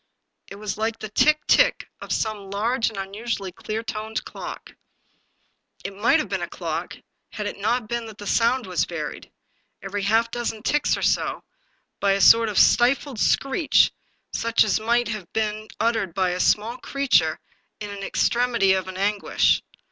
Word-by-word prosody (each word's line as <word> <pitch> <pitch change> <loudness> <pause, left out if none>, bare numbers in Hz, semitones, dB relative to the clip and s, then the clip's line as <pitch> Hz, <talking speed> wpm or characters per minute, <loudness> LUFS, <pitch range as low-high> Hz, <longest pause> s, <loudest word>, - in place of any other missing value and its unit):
It - - -9
was 210 +1 -5
like 225 +1 -1
the 215 - -7
tick, 300 +7 +3
tick - - +3
of - - -8
some 210 -3 -2
large 225 +5 0
and 220 - -11
unusually 200 0 -4
clear 215 +5 -5
toned 220 0 -4
clock. - - -8 1.1
It 195 - -4
might 205 +4 +3
have - - -2
been - - -3
a - - -4
clock, - - -5 0.3
had 210 - -5
it 205 - -5
not 225 +2 0
been 235 0 -3
that 215 -2 -11
the 205 - -9
sound 235 +4 +2
was 180 -4 0
varied, 155 -5 -6 0.5
every 195 +1 -4
half 225 +4 +2
dozen 225 -2 -4
ticks 295 +3 +1
or - - -5
so, - - 0 0.6
by 200 -1 +3
a 195 - 0
sort 230 +2 +6
of 205 - -4
stifled 250 0 +3
screech, 275 +5 +3 0.4
such 230 0 +2
as 215 0 +1
might 235 +2 +1
have 210 -6 -6
been 215 0 -2
uttered 225 -6 0
by 185 -2 +1
some 180 - -3
small 220 +6 +1
creature 250 - +1 0.4
in 205 -1 -6
an 200 -1 -7
extremity 235 -2 +2
of 190 -1 -1
an 185 - -7
guish. 200 +2 +1
215 Hz, 170 wpm, -23 LUFS, 200-235 Hz, 1.1 s, sort